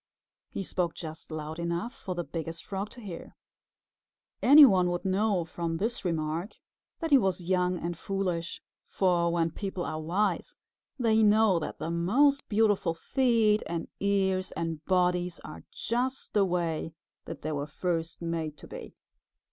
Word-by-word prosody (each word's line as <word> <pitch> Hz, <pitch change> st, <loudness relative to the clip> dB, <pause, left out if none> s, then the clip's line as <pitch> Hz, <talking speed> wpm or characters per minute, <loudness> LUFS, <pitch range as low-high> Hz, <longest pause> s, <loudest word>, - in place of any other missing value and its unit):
He 195 Hz, -, -4 dB
spoke 175 Hz, -2 st, -1 dB
just 160 Hz, -1 st, -8 dB
loud 155 Hz, 0 st, -5 dB
enough 170 Hz, +8 st, -2 dB
for 185 Hz, -3 st, -6 dB
the 175 Hz, -, -2 dB
Biggest 165 Hz, 0 st, -6 dB
Frog 195 Hz, +1 st, -4 dB
to 245 Hz, -, -13 dB
hear. 185 Hz, -6 st, -8 dB, 1.1 s
Any 285 Hz, +3 st, +10 dB
one 185 Hz, -7 st, +4 dB
would 175 Hz, +1 st, -3 dB
know 195 Hz, -2 st, +1 dB
from 165 Hz, 0 st, -3 dB
this 225 Hz, +6 st, -2 dB
remark 165 Hz, +2 st, -2 dB, 0.5 s
that 325 Hz, -1 st, -2 dB
he 275 Hz, -, +8 dB
was 185 Hz, -4 st, -1 dB
young 180 Hz, -1 st, +2 dB
and 170 Hz, +1 st, -3 dB
foolish, 180 Hz, -2 st, -3 dB, 0.2 s
for 175 Hz, -3 st, +2 dB
when 165 Hz, -1 st, +1 dB
people 190 Hz, 0 st, -4 dB
are 155 Hz, 0 st, -4 dB
wise 185 Hz, +7 st, -1 dB, 0.4 s
they 225 Hz, -3 st, +3 dB
know 210 Hz, -3 st, +5 dB
that 155 Hz, -, -5 dB
the 160 Hz, +2 st, -4 dB
most 255 Hz, +12 st, +3 dB
beautiful 205 Hz, -6 st, +2 dB
feet 225 Hz, +1 st, +2 dB
and 170 Hz, -1 st, -4 dB
ears 190 Hz, -2 st, +1 dB
and 165 Hz, -2 st, -4 dB
bodies 180 Hz, -1 st, +1 dB
are 80 Hz, -, -10 dB
just 255 Hz, +3 st, -2 dB
the 205 Hz, -2 st, +4 dB
way 165 Hz, -3 st, -2 dB, 0.3 s
that -, -, -8 dB
they 155 Hz, -, -2 dB
were 145 Hz, -1 st, -3 dB
first 165 Hz, +1 st, -3 dB
made 165 Hz, -3 st, -3 dB
to -, -, -12 dB
be. -, -, -9 dB
180 Hz, 155 wpm, -29 LUFS, 165-205 Hz, 1.1 s, Any